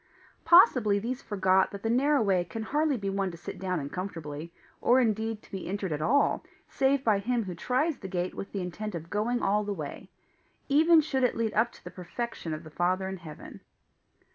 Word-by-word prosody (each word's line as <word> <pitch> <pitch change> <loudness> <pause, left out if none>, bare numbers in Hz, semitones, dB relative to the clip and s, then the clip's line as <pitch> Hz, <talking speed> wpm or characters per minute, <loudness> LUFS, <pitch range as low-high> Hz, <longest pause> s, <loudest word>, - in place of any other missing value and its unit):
Possibly 255 - +6
these 240 +5 -3
forgot 190 -2 +2
that 200 0 -9
the 225 - 0
narrow 275 +2 +3
way 190 -4 +2
can 220 +6 -6
hardly 295 +3 +1
be 200 -3 -4
one 195 -1 -1
to 170 - -9
sit 170 - -8
down 185 -2 -1
in 140 -1 -6
comfortably, 165 -4 -6 0.3
or 250 +2 +5
indeed 220 -2 0
to - - -20
be 195 -2 -5
entered 195 -1 -3
at 150 0 -2
all 280 - +2 0.2
save 270 0 +1
by 215 -5 +3
him 235 +3 0
who 185 -3 -5
tries 260 - 0
the 190 - -7
gate 180 -1 -2
with 195 - -7
the 200 - -3
intent 185 +3 -5
of 165 0 -7
going 230 +4 0
all 210 +2 +2
the 205 -1 -3
way 150 -5 -7 0.6
even 315 +3 +6
should 270 -4 -1
it 250 - +2
lead 225 -2 0
up 235 +2 +2
to - - -17
the - - -8
perfection 180 0 -5
of 155 +1 -5
the 155 - -12
Father 185 +4 0
in 190 0 -4
heaven. 160 -4 -11
205 Hz, 215 wpm, -28 LUFS, 180-245 Hz, 0.6 s, Possibly